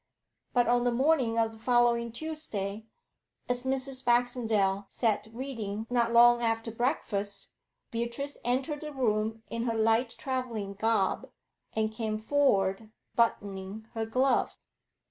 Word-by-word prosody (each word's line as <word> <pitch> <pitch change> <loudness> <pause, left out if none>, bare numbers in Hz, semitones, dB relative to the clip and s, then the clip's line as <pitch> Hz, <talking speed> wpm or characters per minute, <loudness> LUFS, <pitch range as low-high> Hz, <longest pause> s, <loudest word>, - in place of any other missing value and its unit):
But 245 -1 +4
on 240 0 +3
the 245 - +2
morning 255 -2 +2
of 225 -1 +2
the 220 - -14
following 235 0 +3
Tuesday, 225 -8 -4 0.6
as 245 0 0
Mrs. 265 0 -1
Baxendale 225 -5 +2
sat 215 -3 0
reading 225 -4 -4
not 235 -1 +2
long 240 0 +7
after 225 0 0
breakfast, 205 -5 -1 0.4
Beatrice 235 +5 -3
entered 265 +5 -1
the 305 -1 -6
room 220 -3 0
in 230 +1 -2
her 230 -2 0
light 225 +2 +2
travelling 250 -7 -3
garb, 210 -1 0 0.4
and 220 0 0
came 220 -1 -2
forward, 215 -5 +1 0.3
buttoning 205 -2 -1
her 225 -1 -2
glove. 255 +3 +2
230 Hz, 125 wpm, -29 LUFS, 220-250 Hz, 0.6 s, long